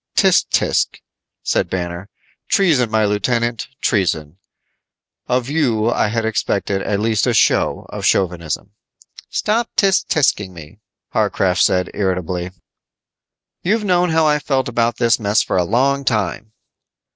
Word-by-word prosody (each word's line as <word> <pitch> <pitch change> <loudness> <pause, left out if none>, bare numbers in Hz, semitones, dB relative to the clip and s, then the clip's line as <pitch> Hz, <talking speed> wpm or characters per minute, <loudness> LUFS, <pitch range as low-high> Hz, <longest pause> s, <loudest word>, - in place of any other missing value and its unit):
"Tch, - - +4
tch," - - 0 0.4
said - - 0
Banner, 90 +1 -4 0.4
"treason, 150 - +2
my 110 -1 +2
lieutenant, 115 +3 -1
treason. 85 - -1 0.9
Of 125 0 0
you 120 -7 +1
I - - +1
had 115 +1 -2
expected 100 -3 -1
at 100 0 -1
least 110 -1 +1
a - - +1
show - - +2
of - - -7
chauvinism." 85 -5 0 0.6
"Stop 225 +2 0
_tch 195 -3 +3
tch_ing 105 -10 +1
me," 85 +4 -13 0.3
Warcraft 95 -1 +1
said 90 0 +2
irritably. 90 -2 -2 1.1
"You've 215 +4 0
known 180 -2 +2
how 160 0 +2
I 150 -1 +3
felt 135 -2 -1
about 120 -1 0
this 120 -1 +2
mess 105 0 +2
for - - -3
a 90 - +3
long 135 +8 +1
time." 110 -3 -2
110 Hz, 135 wpm, -18 LUFS, 95-135 Hz, 1.1 s, Tch